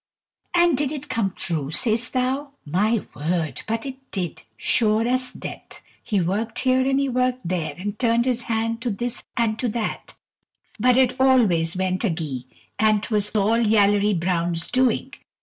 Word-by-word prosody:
And 345 -3 +5
did 280 +1 0
it 295 -1 -6
come 205 -4 0
true, 155 -6 -3
sayst 230 - +1
thou? 265 +2 -1
My 205 +8 +1
word! 155 -3 -2
but 225 +2 -2
it 265 -1 -6
did, 180 -4 -4 0.2
sure 220 - +2
as 255 +1 +1
death! - - -9 0.2
He 205 - 0
worked 200 +6 -1
here 260 0 +3
and 270 0 +2
he 275 - +1
worked 255 -3 0
there, 170 -3 -2
and 205 +3 -5
turned 235 -1 +2
his 250 -2 0
hand 230 0 -1
to 245 - -1
this 240 +3 -3 0.2
and 220 -2 +1
to 250 - +1
that, 220 0 -4 0.6
but 250 0 +4
it 260 0 +2
always 195 -12 +3
went 185 0 0
agee, 160 - -2 0.3
and 215 -1 +3
't 235 - -4
was 210 -1 +2
all 215 +3 +3
Yallery 205 -3 +3
Brown's 170 -1 0
doing. 255 -2 +1
220 Hz, 165 wpm, -23 LUFS, 185-255 Hz, 0.6 s, And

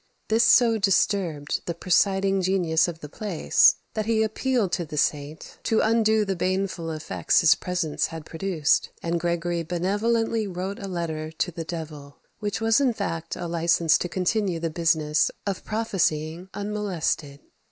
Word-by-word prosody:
This 225 +2 +4
so 230 -3 +5
disturbed 185 -6 +1
the 170 - -2
presiding 195 +2 +2
genius 175 -3 +2
of 170 -1 -6
the 150 - -7
place, 205 - +3 0.2
that 215 -2 -2
he 220 -1 +2
appealed 220 -2 0
to 175 - -1
the 150 -2 -7
saint 150 +1 -2
to 220 - +2
undo 220 -1 +3
the 195 -1 -1
baneful 185 -2 -2
effects 155 -1 0
his 160 - +6
presence 175 -4 -2
had 160 -2 -8
produced; 165 -3 0
and 170 0 -1
Gregory 170 0 -1
benevolently 210 +6 0
wrote 190 +2 -5
a 195 - -6
letter 165 -4 -4
to 175 +2 -2
the 165 0 -5
devil, 150 -4 -7 0.2
which 205 -2 -3
was 225 +3 +3
in 260 -4 +2
fact 165 -6 -4
a 175 - -5
license 170 -1 +2
to 175 - -3
continue 185 0 0
the 165 -1 -2
business 155 -3 +2 0.2
of 200 -2 -3
prophesying 180 -6 -1
unmolested. 195 -8 -2
180 Hz, 155 wpm, -25 LUFS, 160-205 Hz, 0.2 s, his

